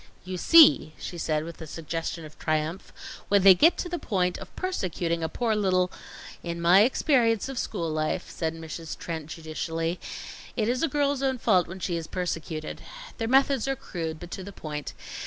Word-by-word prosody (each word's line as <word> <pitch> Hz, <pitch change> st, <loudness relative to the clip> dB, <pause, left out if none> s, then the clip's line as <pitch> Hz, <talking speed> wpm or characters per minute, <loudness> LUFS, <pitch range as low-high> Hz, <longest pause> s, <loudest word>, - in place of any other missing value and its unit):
"You 185 Hz, 0 st, -5 dB
see!" 290 Hz, -, +6 dB
she 175 Hz, -, -7 dB
said, 155 Hz, -1 st, 0 dB
with 165 Hz, +1 st, -9 dB
a 160 Hz, -, -7 dB
suggestion 165 Hz, +1 st, -4 dB
of 155 Hz, -, -14 dB
triumph, 155 Hz, +3 st, -2 dB, 0.4 s
"when 200 Hz, -1 st, +4 dB
they 195 Hz, -1 st, +10 dB
get 320 Hz, -, +5 dB
to -, -, -3 dB
the 350 Hz, -1 st, -3 dB
point 180 Hz, -4 st, 0 dB
of -, -, -8 dB
persecuting 175 Hz, -, -2 dB
a 160 Hz, -, -1 dB
poor 225 Hz, +4 st, 0 dB
little 185 Hz, -3 st, +2 dB, 0.3 s
" -, -, -14 dB
"In 170 Hz, -, -5 dB
my 175 Hz, +3 st, +6 dB
experience 235 Hz, -2 st, +3 dB
of 270 Hz, -2 st, -4 dB
school 170 Hz, -6 st, -2 dB
life," 155 Hz, -1 st, -1 dB
said 160 Hz, -1 st, -3 dB
Mrs. 165 Hz, 0 st, -7 dB
Trent 160 Hz, -3 st, -5 dB
judicially, 165 Hz, +1 st, -3 dB, 0.6 s
"it 215 Hz, -2 st, +1 dB
is 250 Hz, +2 st, 0 dB
a 325 Hz, -, +3 dB
girl's 285 Hz, -1 st, 0 dB
own 265 Hz, -1 st, +1 dB
fault 190 Hz, -7 st, +3 dB
when 185 Hz, +2 st, -8 dB
she 175 Hz, -1 st, -1 dB
is 165 Hz, -1 st, -5 dB
persecuted. 165 Hz, -3 st, -4 dB, 0.4 s
Their 225 Hz, -, -1 dB
methods 270 Hz, 0 st, +3 dB
are 270 Hz, -, +1 dB
crude, 165 Hz, -9 st, -5 dB
but 175 Hz, 0 st, -10 dB
to 190 Hz, -, -5 dB
the 200 Hz, -, -8 dB
point. 150 Hz, -5 st, -6 dB
180 Hz, 195 wpm, -27 LUFS, 160-230 Hz, 0.6 s, they